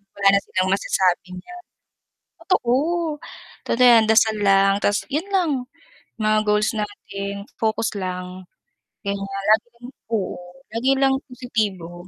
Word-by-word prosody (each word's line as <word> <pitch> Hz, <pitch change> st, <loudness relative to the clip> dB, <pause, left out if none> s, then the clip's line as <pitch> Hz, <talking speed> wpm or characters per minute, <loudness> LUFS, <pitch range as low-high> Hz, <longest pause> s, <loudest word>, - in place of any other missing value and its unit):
wala 200 Hz, 0 st, +1 dB
na -, -, +4 dB
silang 185 Hz, 0 st, -1 dB
masasabi 185 Hz, -2 st, +1 dB
niyan. 355 Hz, -, -12 dB, 0.8 s
Totoo, 245 Hz, -11 st, +1 dB, 0.9 s
totoo 250 Hz, +2 st, +3 dB
yan, 230 Hz, -2 st, +7 dB
dasal 220 Hz, 0 st, +4 dB
lang, 195 Hz, 0 st, +4 dB
tas 205 Hz, +1 st, +1 dB
yun 320 Hz, +7 st, -1 dB
lang. 350 Hz, -5 st, +2 dB, 0.7 s
Mga 215 Hz, 0 st, +2 dB
goals 210 Hz, +1 st, +2 dB
natin 200 Hz, -1 st, -5 dB, 0.2 s
focus 220 Hz, 0 st, 0 dB
lang, 185 Hz, -1 st, -5 dB, 0.6 s
ganyan 200 Hz, 0 st, -2 dB, 0.3 s
laging 240 Hz, +3 st, -1 dB, 0.2 s
oo, 205 Hz, -4 st, -1 dB, 0.3 s
lagi 240 Hz, +4 st, +1 dB
lang 270 Hz, -1 st, +3 dB, 0.2 s
positibo, 195 Hz, -8 st, -4 dB
210 Hz, 120 wpm, -22 LUFS, 195-240 Hz, 0.9 s, yan